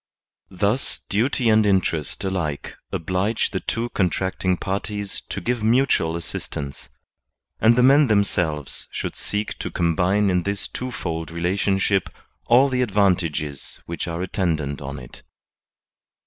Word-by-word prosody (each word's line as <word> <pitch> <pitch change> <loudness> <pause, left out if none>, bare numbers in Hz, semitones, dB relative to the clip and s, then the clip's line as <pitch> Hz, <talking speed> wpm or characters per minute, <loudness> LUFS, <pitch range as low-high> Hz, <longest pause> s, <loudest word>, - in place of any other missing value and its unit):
Thus 100 +7 -1
duty 120 +4 +1
and 110 0 +5
interest 95 -4 +1
alike 90 -7 -2 0.2
oblige 95 +6 0
the 95 - -1
two 115 +4 -2
contracting 95 -1 0
parties 100 +1 -2
to - - -3
give 120 +5 -1
mutual 110 -8 +3
assistance; 70 -6 -6 0.7
and 115 +1 +5
the 125 - +4
men 140 +2 +6
themselves 90 - 0
should - - -4
seek 105 +1 -3
to - - -3
com 85 -1 0
bine 95 +4 +3
in 90 0 +2
this 100 +2 -2
twofold 85 -11 -4
relationship 95 +3 +1 0.4
all 125 +4 +6
the 130 -2 0
advantages 90 - 0
which 85 +1 -4
are 85 +1 -3
attendant 80 -7 -1
on 70 +1 -5
it. 65 -1 -11
95 Hz, 130 wpm, -23 LUFS, 85-105 Hz, 0.7 s, men